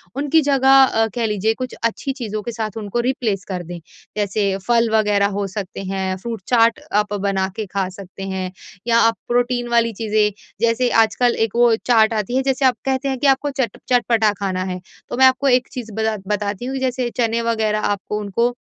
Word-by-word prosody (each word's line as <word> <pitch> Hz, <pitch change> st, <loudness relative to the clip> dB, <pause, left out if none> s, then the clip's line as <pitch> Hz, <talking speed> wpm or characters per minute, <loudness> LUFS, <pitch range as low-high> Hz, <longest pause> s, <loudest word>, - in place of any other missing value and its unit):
उनकी 290 Hz, +3 st, +2 dB
जगह 270 Hz, -2 st, +3 dB
अ, 225 Hz, -3 st, +2 dB
कह 235 Hz, -2 st, 0 dB
लीजिए 215 Hz, 0 st, 0 dB
कुछ 255 Hz, +2 st, -6 dB
अच्छी 230 Hz, +4 st, -1 dB
चीज़ों 215 Hz, -6 st, -4 dB
के 235 Hz, -, -4 dB
साथ 220 Hz, -1 st, -4 dB
उनको 215 Hz, +2 st, -3 dB
रिप्लेस 225 Hz, -8 st, -1 dB
कर 180 Hz, -2 st, -3 dB
दें। 175 Hz, +1 st, -8 dB, 0.4 s
जैसे 200 Hz, -1 st, 0 dB
फल 235 Hz, -1 st, +3 dB
वग़ैरह 205 Hz, -2 st, +3 dB
हो 200 Hz, -, -1 dB
सकते 195 Hz, -1 st, -6 dB
हैं 190 Hz, -1 st, -2 dB
फ्रूट 225 Hz, +2 st, -6 dB
चाट 230 Hz, -2 st, +3 dB
आप 210 Hz, 0 st, +1 dB
बना 195 Hz, -1 st, 0 dB
के 220 Hz, -, -3 dB
खा 190 Hz, -1 st, -2 dB
सकते 195 Hz, 0 st, -10 dB
हैं 190 Hz, -1 st, -4 dB, 0.4 s
या 230 Hz, 0 st, +4 dB
आप 230 Hz, 0 st, +4 dB
प्रोटीन 245 Hz, 0 st, 0 dB
वाली 230 Hz, -1 st, +2 dB
चीज़ें 215 Hz, -1 st, +2 dB, 0.3 s
जैसे 235 Hz, +2 st, +2 dB, 0.2 s
आजकल 240 Hz, +3 st, 0 dB
एक 220 Hz, -, -10 dB
वो 240 Hz, -1 st, +5 dB
चाट 225 Hz, -2 st, +4 dB
आती 215 Hz, +3 st, -2 dB
है -, -, +2 dB
जैसे 265 Hz, +1 st, 0 dB
आप 255 Hz, -1 st, +4 dB
कहते 265 Hz, +1 st, 0 dB
हैं 265 Hz, -, -2 dB
कि 285 Hz, -, +2 dB
आपको 275 Hz, +2 st, +2 dB
चट 230 Hz, -5 st, -3 dB
चटपटा 230 Hz, -3 st, +3 dB
खाना 185 Hz, -2 st, -2 dB
है। 180 Hz, -, -7 dB, 0.3 s
तो -, -, -4 dB
मैं 265 Hz, -, +6 dB
आपको 260 Hz, +1 st, +3 dB
एक 250 Hz, -1 st, +3 dB
चीज़ 235 Hz, -3 st, -7 dB
बता 220 Hz, 0 st, -1 dB, 0.2 s
बताती 205 Hz, +2 st, -4 dB
हूँ 265 Hz, +1 st, -3 dB
जैसे 255 Hz, -2 st, -1 dB
चने 230 Hz, -1 st, +1 dB
वग़ैरह 220 Hz, -2 st, 0 dB
आपको 205 Hz, 0 st, -2 dB
उनको 235 Hz, +4 st, 0 dB
225 Hz, 200 wpm, -20 LUFS, 205-245 Hz, 0.4 s, मैं